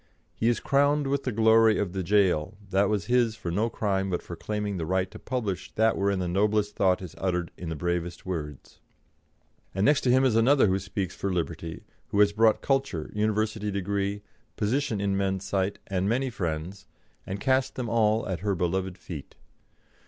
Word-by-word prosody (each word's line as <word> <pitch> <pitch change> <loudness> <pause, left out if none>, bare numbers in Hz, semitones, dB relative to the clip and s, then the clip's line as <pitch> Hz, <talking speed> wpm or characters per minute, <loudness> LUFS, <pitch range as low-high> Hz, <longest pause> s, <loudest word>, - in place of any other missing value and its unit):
He 115 - +1
is 120 - +1
crowned 145 +1 +2
with 140 0 -1
the 130 - 0
glory 110 0 +5
of 95 -4 -2
the 95 - -2
jail, 95 -1 +2
that 95 +1 +3
was 105 -3 0
his 120 -2 +2
for 85 - -5
no 105 +6 +1
crime 95 -3 -1
but 90 - -2
for 85 - -7
claiming 105 +1 -3
the 80 - -3
right 95 +1 0
to - - -10
publish 100 -8 -3
that 110 +1 +3
wherein 100 0 +1
the 90 -1 -2
noblest 105 +3 +1
thought 95 -1 +2
is 90 -3 -8
uttered 90 -2 -1
in 90 - -6
the 80 - -3
bravest 85 +1 -3
words. 75 -7 -6 1.0
And 95 +1 +1
next 145 -1 +4
to 125 - 0
him 130 +2 +5
is 125 -4 +3
another 130 +4 +5
who 95 -1 +2
speaks 95 -1 -4
for 100 - -2
liberty, 85 -2 -4 0.2
who 100 - -1
has 105 0 +5
brought 110 +1 +3
culture, 135 - -1
university 105 0 0
degree, 100 +1 -2 0.3
position 115 0 0
in 100 -1 0
men's 95 -1 -1
sight, 100 0 -1
and 95 0 -1
many 130 +3 0
friends, 90 -2 -4 0.4
and 95 +2 -4
cast 130 +2 +1
them 125 -2 -3
all 110 -1 +2
at 95 -4 -2
her 100 +1 -1
beloved 90 +1 -1
feet. 85 -5 -9
100 Hz, 190 wpm, -27 LUFS, 90-110 Hz, 1.0 s, glory